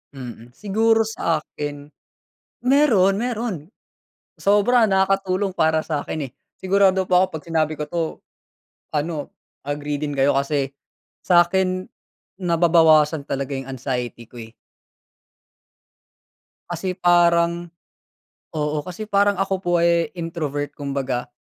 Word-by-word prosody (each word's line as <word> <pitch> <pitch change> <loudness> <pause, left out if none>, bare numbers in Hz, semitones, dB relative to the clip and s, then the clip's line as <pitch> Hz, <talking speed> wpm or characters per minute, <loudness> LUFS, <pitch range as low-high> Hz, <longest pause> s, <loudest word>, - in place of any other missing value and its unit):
Mm, 120 -1 -10
siguro 225 +4 +2
sa 165 -8 -1
akin, 145 0 -7 0.7
meron, 250 -8 +4
meron. 235 -4 -2 0.8
Sobra 215 +4 +4
nakakatulong 195 0 +1
para 160 -3 +2
sa'kin 150 -2 -3
eh, - - -33 0.3
sigurado 190 0 +3
po 180 - +5
'ko 185 - +5
kapag 160 0 -9
sinabi 155 -1 +1
ko 150 - -4
'to, 170 +1 -1 0.9
ano, 150 0 -3 0.3
agree 145 0 -3
din 145 0 -3
kayo 135 0 +2
kasi 140 -1 0 0.6
sa'kin, 185 +1 +2 0.5
nababawasan 160 -3 +4
talaga 140 0 -2
yung 135 0 -5
anxiety 125 -2 -4
ko 120 -2 -10
eh. 110 - -11 2.2
Kasi 180 +2 -3
parang 170 -1 +3 0.8
oo, 150 0 -1
kasi 180 +4 -6
parang 205 -1 +2
ako 195 +1 -1
po 175 -2 -3
ay 170 -1 +2
introvert 155 -4 -4
kumbaga, 135 -3 -3
170 Hz, 110 wpm, -22 LUFS, 145-190 Hz, 2.2 s, po